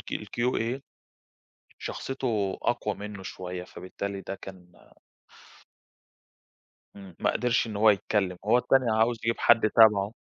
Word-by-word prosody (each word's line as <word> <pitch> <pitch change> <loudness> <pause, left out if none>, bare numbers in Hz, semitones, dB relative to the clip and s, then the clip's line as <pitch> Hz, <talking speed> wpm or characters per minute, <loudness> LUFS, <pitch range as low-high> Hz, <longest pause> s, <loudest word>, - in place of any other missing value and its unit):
الQA 120 +1 -2 1.0
شخصيته 115 -8 -3
أقوى - - -1
منه 100 -1 -8
شوية، 90 -1 -6
فبالتالي 100 +2 -6
ده 95 - -6
كان 90 -3 -12 2.3
امم، 95 -3 -12
ما - - +2
قدرش 125 -1 +1
إن 110 - -6
هو 110 +1 +6
يتكلم، 95 -2 0
هو 115 +4 +4
التاني 130 -1 +2
عاوز 115 +1 +2
يجيب 115 0 0
حد 110 -2 +4
تَبعه. 105 -2 +5
105 Hz, 115 wpm, -27 LUFS, 95-115 Hz, 2.3 s, هو